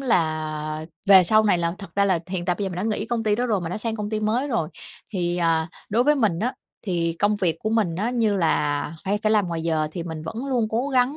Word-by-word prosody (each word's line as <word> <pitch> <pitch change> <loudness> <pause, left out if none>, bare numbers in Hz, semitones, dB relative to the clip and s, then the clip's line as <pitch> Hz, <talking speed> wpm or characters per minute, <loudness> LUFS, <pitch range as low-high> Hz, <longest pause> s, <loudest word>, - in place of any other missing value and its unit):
là 155 - -1 0.2
về 190 -2 +8
sau 215 +4 +4
này 200 -4 +3
là 170 0 -1
thật 200 - -9
ra 200 - +4
là 185 -4 +2
hiện 180 -2 -2
tại 180 -1 +1
bây 205 - -1
giờ 195 - -1
mình 180 - -7
đã 180 - -2
nghĩ - - -3
công 235 -2 -1
ty 210 -1 +2
đó 245 - 0
rồi, 210 -5 +1
mình 165 - -4
đã 185 - -3
sang 225 0 -3
công 210 0 -4
ty 215 - -1
mới 235 +7 0
rồi. 195 - 0 0.4
Thì, 175 -2 -1
à, 165 -1 +1 0.2
đối 235 +4 +2
với 295 - +5
mình 210 -10 +1
á 240 +7 -1 0.3
thì 170 -4 0
công 205 +1 +2
việc 175 -5 +1
của 215 - -2
mình 215 -7 +1
nó 205 +7 -1
như 225 -5 +1
là 150 -2 0
phải 205 +2 0
cả 215 0 0
làm 205 -5 +3
ngoài 165 -1 -3
giờ 160 -2 0
thì 175 - -4
mình 160 -2 -6
vẫn 225 +11 -5
luôn 245 -5 +1
cố 240 +5 0
gắng, 260 +2 +2
195 Hz, 275 wpm, -24 LUFS, 170-220 Hz, 0.4 s, về